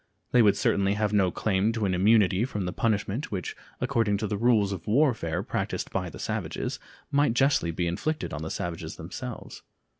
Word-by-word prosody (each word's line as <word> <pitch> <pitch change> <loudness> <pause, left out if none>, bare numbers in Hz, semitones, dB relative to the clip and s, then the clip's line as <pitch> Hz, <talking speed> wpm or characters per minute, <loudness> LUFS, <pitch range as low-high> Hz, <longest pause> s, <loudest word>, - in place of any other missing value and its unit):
They 125 - +6
would 105 -3 +4
certainly 100 0 +2
have 105 0 0
no 95 -3 +4
claim 100 +3 +1
to 110 -2 -1
an 95 - +1
immunity 100 +1 +4
from 105 -7 -3
the 90 - -3
punishment 110 - -1
which, 95 -5 -4 0.2
according 115 -5 +1
to 110 - -2
the 105 - -2
rules 105 -2 +3
of 95 -4 -6
warfare 115 - +1
practiced - - -3
by - - -2
the - - -10
savages, - - -3 0.3
might 145 -4 +3
justly 135 -9 +3
be 85 +1 -1
inflicted 150 - -2
on 75 - -4
the 80 - -4
savages 85 0 -4
themselves. - - -7
105 Hz, 185 wpm, -27 LUFS, 95-115 Hz, 0.3 s, They